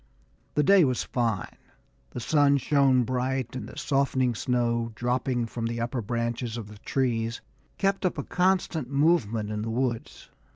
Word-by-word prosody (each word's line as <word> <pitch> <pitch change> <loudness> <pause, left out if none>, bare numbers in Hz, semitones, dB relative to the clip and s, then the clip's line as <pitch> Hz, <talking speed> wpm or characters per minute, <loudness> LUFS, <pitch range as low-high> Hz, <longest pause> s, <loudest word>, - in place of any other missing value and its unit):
The 150 - +3
day 195 +4 +6
was 130 -4 +1
fine. 115 -7 -2 0.5
The - - -6
sun 140 +3 +3
shone 135 -2 +3
bright, 130 +1 -2
and 130 - -5
the - - -12
softening 130 -3 +1
snow, 120 0 0
dropping 125 +1 0
from 115 0 -4
the 115 0 -3
upper 120 +1 -2
branches 115 +1 -2
of 110 -3 -7
the 105 -1 -12
trees, 115 -2 -1 0.4
kept 195 0 0
up 185 - 0
a - - -2
constant 180 -7 0
movement 130 -8 +2
in 105 0 -3
the 115 - -3
woods. 120 0 -3
125 Hz, 160 wpm, -27 LUFS, 115-140 Hz, 0.5 s, day